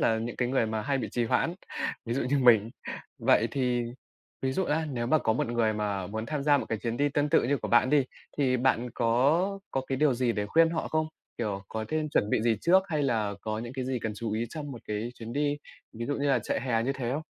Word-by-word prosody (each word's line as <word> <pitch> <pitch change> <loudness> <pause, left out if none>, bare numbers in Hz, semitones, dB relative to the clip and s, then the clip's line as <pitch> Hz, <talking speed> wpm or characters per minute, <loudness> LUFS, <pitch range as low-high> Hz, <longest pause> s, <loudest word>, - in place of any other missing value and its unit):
là 110 - +3
những 115 +2 -4
cái 125 - 0
người 130 -3 +2
mà 110 0 -2
hay 135 +5 0
bị 115 -4 -3
trì 120 +2 0
hoãn, 165 +8 +1 0.5
ví 115 - -2
dụ 135 - 0
như 140 +3 +1
mình. 115 -4 +5 0.5
Vậy 115 - +3
thì 125 -2 0 0.6
ví 130 0 0
dụ 190 - 0
á 160 0 0
nếu 120 -2 -2
mà 155 +5 +4
có 110 - +1
một 110 - 0
người 115 -2 +2
mà 105 -3 -2
muốn 110 +3 -4
tham 150 +1 -2
gia 145 0 +4
một - - -4
cái 110 - -1
chuyến 115 +1 -3
đi 145 +3 +2
tương 145 +1 0
tự 160 - +4
như 140 +4 +1
của - - -4
bạn 120 +1 +4
đi, 145 -2 +4 0.3
thì 130 -3 +3
bạn 125 -1 +1
có 145 +12 +2
có 135 - 0
cái 135 - -1
điều 145 -1 +3
gì 120 -1 +1
để 105 -2 -2
khuyên 165 +9 +4
họ 165 - -2
không? 155 0 +1 0.3
Kiểu, 105 -4 -2
có 110 0 -3
nên 155 -1 0
chuẩn 105 -7 +1
bị - - +2
gì 115 -1 +2
trước 185 +3 +5
hay 155 -4 0
là 110 -6 0
có 110 0 -3
những 120 +2 -6
cái 130 -1 -3
gì 130 0 -1
cần 110 - -2
chú 110 0 -3
ý 115 +2 -1
trong 145 -3 -6
một 120 - -8
cái 105 +3 -2
chuyến 115 -1 -8
đi, 145 +2 +1 0.4
ví 115 +1 -5
dụ 145 - 0
như 140 0 0
là 135 -3 +4
trại 110 - -2
hè 115 -2 +1
như 130 +4 0
thế 125 -3 -3
không? 150 +3 -2
125 Hz, 270 wpm, -28 LUFS, 115-145 Hz, 0.6 s, mình